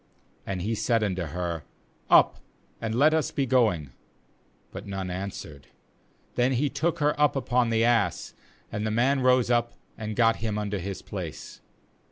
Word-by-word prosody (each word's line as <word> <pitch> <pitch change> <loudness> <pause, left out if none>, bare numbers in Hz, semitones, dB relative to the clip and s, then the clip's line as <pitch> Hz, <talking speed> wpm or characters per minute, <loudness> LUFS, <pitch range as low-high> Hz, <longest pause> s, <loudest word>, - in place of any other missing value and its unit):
28And 95 -2 -3
he 110 +4 -1
said 115 0 +1
unto 95 -4 -1
her: 85 0 -3 0.5
'Up, - - +5 0.4
and 115 0 -2
let 150 +5 +5
us 160 -2 +1
be 140 - -1
going'; 110 - +2 0.8
but 100 +3 -8
none 95 -2 -4
answered; 90 -7 -7 0.7
then 125 +2 +2
he 140 +4 +1
took 155 +4 0
her 150 0 +2
up 150 - +4
upon 125 -3 +1
the 115 0 +2
ass; 115 -8 +1 0.4
and 105 - -3
the 110 - 0
man 125 +6 +2
rose 125 -1 +3
up, 120 0 +1 0.2
and 110 -1 -4
got 115 -1 +3
him 110 -2 -2
unto 105 -1 -2
his 95 +2 -6
place. - - -7
115 Hz, 165 wpm, -27 LUFS, 95-125 Hz, 0.8 s, Up